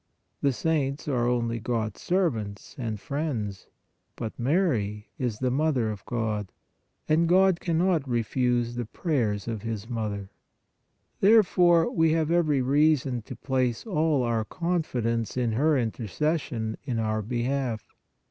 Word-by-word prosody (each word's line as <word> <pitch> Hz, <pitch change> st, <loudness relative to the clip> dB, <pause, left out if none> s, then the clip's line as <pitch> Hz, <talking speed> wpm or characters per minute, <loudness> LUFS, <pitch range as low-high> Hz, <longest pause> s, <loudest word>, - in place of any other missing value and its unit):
The 140 Hz, -, +3 dB
saints 140 Hz, 0 st, -1 dB
are 125 Hz, -4 st, +1 dB
only 115 Hz, -1 st, 0 dB
God 110 Hz, -1 st, -2 dB
s -, -, -15 dB
servants 115 Hz, -, -1 dB
and 110 Hz, -4 st, -3 dB
friends; 115 Hz, -6 st, -3 dB, 0.5 s
but 115 Hz, -2 st, -4 dB
Mary 120 Hz, -, 0 dB
is 120 Hz, -5 st, -1 dB
the 130 Hz, +1 st, 0 dB
Mother 135 Hz, -5 st, +1 dB
of 100 Hz, -2 st, -8 dB
God, 110 Hz, -5 st, -2 dB, 0.6 s
and 165 Hz, +2 st, +3 dB
God 185 Hz, -1 st, +5 dB
cannot 170 Hz, -4 st, +1 dB
refuse 120 Hz, 0 st, +1 dB
the 120 Hz, 0 st, -3 dB
prayers 115 Hz, -, -1 dB
of 110 Hz, -3 st, -3 dB
His 115 Hz, -2 st, -3 dB
66 -, -, -14 dB
PRAYER 120 Hz, -, -7 dB
Mother. 100 Hz, -3 st, -3 dB, 0.9 s
Therefore, 180 Hz, -5 st, +5 dB
we 160 Hz, -1 st, +3 dB
have 160 Hz, -1 st, +1 dB
every 155 Hz, -6 st, +2 dB
reason 140 Hz, -2 st, +2 dB
to -, -, -9 dB
place 130 Hz, -4 st, -1 dB
all 155 Hz, -, +1 dB
our 115 Hz, -2 st, 0 dB
confidence 125 Hz, -, -1 dB
in 120 Hz, -2 st, +1 dB
her 145 Hz, +6 st, +3 dB
intercession 115 Hz, -, -2 dB
in 125 Hz, -4 st, -2 dB
our 110 Hz, -1 st, 0 dB
behalf. 120 Hz, +1 st, -2 dB
125 Hz, 140 wpm, -27 LUFS, 115-155 Hz, 0.9 s, God